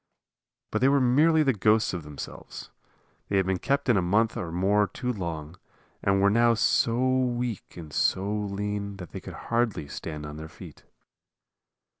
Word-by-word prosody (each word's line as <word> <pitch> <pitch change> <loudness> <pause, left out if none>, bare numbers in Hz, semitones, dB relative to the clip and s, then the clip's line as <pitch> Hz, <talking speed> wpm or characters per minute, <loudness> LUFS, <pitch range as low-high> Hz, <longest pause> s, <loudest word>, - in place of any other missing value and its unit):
But - - -1
they 130 - +5
were 140 0 +4
merely 155 +6 +4
the 135 -3 +3
ghosts 110 +1 +2
of 85 - -3
themselves. 75 -1 -9 0.6
They 100 - +1
had 95 - +2
been 95 -1 0
kept 140 +5 0
in 120 -5 +4
a - - +3
month 105 +6 +2
or 85 -2 -4
more 100 +4 +2
too 125 +3 -3
long, 85 -4 -5 0.4
and 100 0 +2
were 100 +1 +4
now 115 +1 +4
so 115 +3 +2
weak 125 -6 -1
and 80 -4 -9
so 100 +2 +1
lean 100 -1 -3
that 90 -3 -9
they - - -6
could - - -9 0.2
hardly 115 -10 0
stand 75 0 -6
on 75 0 -7
their 80 0 -8
feet. - - -13
105 Hz, 175 wpm, -27 LUFS, 90-120 Hz, 0.6 s, they